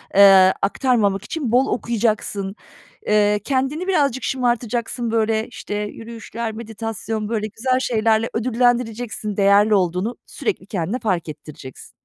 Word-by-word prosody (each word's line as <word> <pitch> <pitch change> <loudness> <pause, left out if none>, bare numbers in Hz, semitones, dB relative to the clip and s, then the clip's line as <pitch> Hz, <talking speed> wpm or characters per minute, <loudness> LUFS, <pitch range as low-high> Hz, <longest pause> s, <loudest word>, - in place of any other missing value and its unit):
eee, 190 -1 +8
aktarmamak 205 -3 +1
için 290 -8 -3
bol 255 +3 +4
okuyacaksın. 210 -4 -1 0.5
Eee, 210 0 +3
kendini 275 - -1
birazcık 280 -8 +1
şımartacaksın, 240 -2 -1
böyle, 220 -1 +1
işte, 220 -3 -7
yürüyüşler, 225 +2 -5
meditasyon, 220 -1 -5
böyle, 215 -2 -1
güzel 255 +4 0
şeylerle 225 -2 +1
ödüllendireceksin, 235 -3 0
değerli 200 +2 +5
olduğunu 185 +4 0
sürekli 405 - -4
kendine 200 +5 -2
fark 185 -7 -1
ettireceksin. 150 -3 -11
225 Hz, 115 wpm, -21 LUFS, 205-245 Hz, 0.5 s, eee